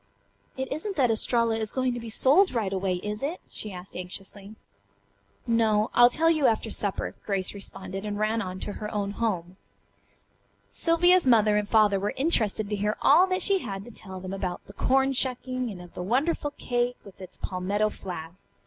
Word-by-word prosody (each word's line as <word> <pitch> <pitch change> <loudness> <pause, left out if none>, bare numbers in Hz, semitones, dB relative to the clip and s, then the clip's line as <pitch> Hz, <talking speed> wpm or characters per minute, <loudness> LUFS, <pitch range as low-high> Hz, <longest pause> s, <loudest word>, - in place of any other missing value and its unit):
"It 265 +1 -3
isn't 385 +7 -4
that 255 -5 +3
Estralla 230 0 +2
is 220 -1 -2
going 255 -1 0
to 240 - -4
be 230 -1 -7
sold 280 - +4
right 205 -4 -1
away, 190 -1 0
is 210 0 -4
it?" 305 +6 -3
she 215 - -5
asked 180 0 -9
anxiously. 195 +3 -7 0.9
"No. 220 -2 +2
I'll 240 0 +7
tell 325 +6 +2
you 310 -4 +3
after 220 0 0
supper," 200 -2 -1
Grace 195 -3 -1
responded 195 -1 -6
and 205 -1 -3
ran 215 +2 0
on 185 -2 -5
to - - -3
her 210 +1 -6
own 200 -1 -2
home. 190 -5 -2 1.1
Sylvia's 350 0 +3
mother 215 -4 +5
and 210 0 0
father 210 -3 +4
were 200 +2 -2
interested 220 - +1
to - - +1
hear 210 +1 -1
all 340 +7 +6
that 370 0 0
she 395 -1 +3
had 195 - -6
to 240 - -11
tell 190 -4 -9
them 185 +1 -6
about 185 -2 -4
the 200 - -13
corn 270 +4 +2
shucking, 255 -1 0
and 195 -4 -7
of 175 -1 -12
the - - -6
wonderful 285 - 0
cake 245 0 -1
with 195 -1 -14
its 185 - -10
palmetto 200 +3 -1
flag. 165 -3 -7
215 Hz, 190 wpm, -27 LUFS, 195-255 Hz, 1.1 s, I'll